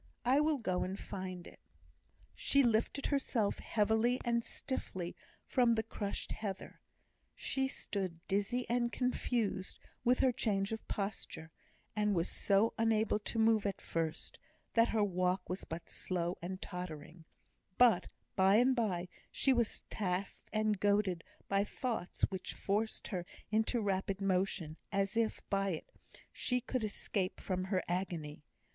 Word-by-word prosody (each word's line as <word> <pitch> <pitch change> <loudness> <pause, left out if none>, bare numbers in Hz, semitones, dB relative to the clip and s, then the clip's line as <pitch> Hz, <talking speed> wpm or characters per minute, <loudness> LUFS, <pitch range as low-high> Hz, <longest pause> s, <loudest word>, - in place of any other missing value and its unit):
I 260 +4 +5
will 300 0 +3
go 185 -7 0
and 190 +2 -3
find 185 -2 -5
it." - - -13 0.7
She 280 0 +3
lifted 235 +4 +2
herself 250 -7 +1
heavily 220 +3 +2
and 235 -1 +2
stiffly 185 -11 -3 0.3
from 240 -3 +4
the 220 - +1
crushed 205 -2 -4
heather. 200 -3 -5 0.5
She 265 -1 0
stood 190 -9 -3
dizzy 205 +5 0
and 240 0 +1
confused 235 -6 -1 0.2
with 250 +1 +4
her 260 - +4
change 200 -4 0
of 225 - -4
posture; 195 -5 -4 0.4
and 210 -1 +2
was 170 0 +2
so 200 +3 +2
unable 220 -1 +3
to 215 - -4
move 220 -2 +4
at 195 - -2
first, 165 -1 -3 0.3
that 230 0 +5
her 215 -2 +2
walk 180 -1 +1
was 185 +2 -3
but 165 +1 -6
slow 175 -1 -1
and 185 +2 -4
tottering; 170 -2 -7 0.5
but, 240 -7 +6 0.3
by 190 +1 +5
and 250 +3 +5
by, 185 -7 0 0.2
she 270 - +3
was 235 -3 +1
tasked 190 -1 -2
and 215 -2 +1
goaded 200 -4 +2 0.2
by 200 0 +3
thoughts 225 -3 -3
which 190 -2 -5
forced 210 +3 -1
her 180 -3 -2 0.3
into 220 +3 +2
rapid 195 0 0
motion, 185 -4 0
as 195 +1 +1
if, 230 -1 +1
by 195 0 +2
it, 165 -4 -3 0.5
she 250 -1 +1
could 255 -1 -2
escape 200 -2 -2
from 185 -1 -1
her 185 -2 0
agony. 170 -5 -2
200 Hz, 145 wpm, -35 LUFS, 185-230 Hz, 0.7 s, but